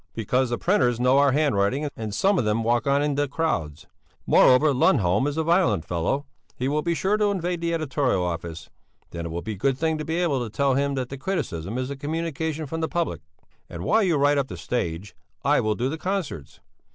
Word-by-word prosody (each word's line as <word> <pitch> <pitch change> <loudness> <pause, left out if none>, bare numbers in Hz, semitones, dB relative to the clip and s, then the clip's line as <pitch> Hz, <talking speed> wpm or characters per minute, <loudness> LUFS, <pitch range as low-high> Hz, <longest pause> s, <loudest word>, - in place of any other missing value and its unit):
"Because 125 +3 0
the 120 - -1
printers 125 - +2
know 125 +2 +4
our 140 -1 +4
handwriting 140 -1 +1
and 110 -2 -5
some 195 - +2
of - - +1
them 105 +1 0
walk 120 +3 +1
on 140 +1 +3
in 145 -1 0
the 145 +1 0
crowds. 85 - -2 0.4
Moreover 140 +3 +5
Lundholm 110 -3 +3
is 145 +1 -3
a 160 - +1
violent 170 - +2
fellow; 90 - -1 0.3
he 125 - -2
will 150 +2 0
be 170 +1 -1
sure 195 +5 +1
to 210 -1 +2
invade 180 -3 -2
the 170 0 -1
editorial 140 - 0
office; 85 -1 -5 0.4
then 85 0 -5
it - - -6
will 85 +1 -5
be 110 - -4
a - - -2
good 130 +6 0
thing 160 +1 0
to - - -3
be 160 +2 -3
able 160 -8 0
to 115 - -5
tell 135 +6 +1
him 140 +1 0
that 130 -2 -3
the 135 - -7
criticism 115 - -3
is 130 +1 -3
a - - -4
communication 160 +1 -3
from 160 +3 -4
the 160 - -1
public. 165 - -2 0.5
And 85 0 -7
while 225 - +3
you 175 -6 +2
write 145 0 +3
up 135 - -1
the - - -8
stage, 90 -4 -3 0.3
I - - +4
will 110 0 0
do 120 +4 -1
the 155 +4 -4
concerts. 175 - -4
140 Hz, 225 wpm, -24 LUFS, 110-160 Hz, 0.5 s, Moreover